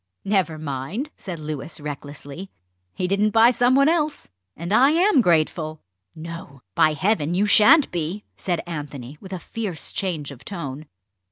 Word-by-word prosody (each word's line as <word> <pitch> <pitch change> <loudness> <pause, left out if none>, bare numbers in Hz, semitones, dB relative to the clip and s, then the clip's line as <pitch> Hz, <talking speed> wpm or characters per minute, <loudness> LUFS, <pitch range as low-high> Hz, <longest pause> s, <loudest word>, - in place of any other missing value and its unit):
"Never 190 -6 +1
mind," 155 - -4
said 180 -3 -7
Louis 155 +1 -5
recklessly. 145 +4 -7 0.5
"He 180 - -1
didn't 200 +3 +2
buy 225 +3 +6
some 245 +1 +3
one 275 +1 +5
else 310 -2 0 0.3
and 170 +5 -3
I 265 +5 +6
am 335 -1 +4
grateful!" 155 -3 +1 0.4
"No; 160 -5 -9
by 160 -2 +4
Heaven, 175 -1 0
you 200 +3 +2
shan't 220 +9 +6
be!" 175 +4 -3
said 175 -3 -2
Anthony, 145 -4 -7
with 190 - -11
a 185 - -3
fierce 185 -4 -5
change 165 -8 -3
of 130 - -12
tone. 155 -6 -6
175 Hz, 155 wpm, -23 LUFS, 150-210 Hz, 0.5 s, buy